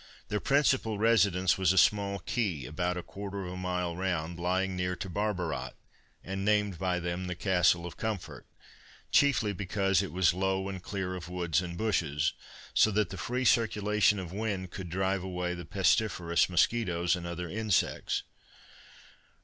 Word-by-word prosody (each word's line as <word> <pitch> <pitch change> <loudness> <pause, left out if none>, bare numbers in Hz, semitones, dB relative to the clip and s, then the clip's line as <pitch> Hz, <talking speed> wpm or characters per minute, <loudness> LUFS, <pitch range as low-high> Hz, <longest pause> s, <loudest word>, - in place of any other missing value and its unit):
Their 105 -1 0
principal 130 -6 +2
residence 100 -5 +3
was 95 -2 +4
a 95 - 0
small 100 +2 +3
key, 95 - -2
about 90 +6 -2
a 90 - -4
quarter 100 +1 -6
of 90 - -6
a - - -6
mile 90 -2 -2
round, 85 -2 -2
lying 95 +2 0
near 90 0 -1
to 95 +3 -6
Barbarat, 90 -9 -2 0.5
and 95 +1 -4
named 105 -4 +1
by 90 -1 0
them 90 +1 -3
the 90 - -3
Castle 90 -1 +2
of 85 -2 -8
Comfort, 110 -5 -4 0.6
chiefly 130 -7 +3
because 95 +1 +1
it 100 - -5
was 90 -1 +3
low 95 +1 0
and 95 -2 -6
clear 95 -1 -4
of 90 -2 -7
woods 85 -2 0
and 85 -1 -6
bushes, 80 -9 0 0.4
so - - +5
that 105 -3 0
the - - -5
free 125 +8 -2
circulation 105 -2 +3
of 90 -2 -6
wind 100 -4 -3
could 95 -3 -7
drive 95 +2 0
away 90 -1 -3
the 85 -1 -7
pestiferous 90 -1 +2
musquitoes 90 -2 +2
and 85 -1 -6
other 85 0 -4
insects. 105 +2 0
95 Hz, 165 wpm, -30 LUFS, 90-100 Hz, 0.6 s, so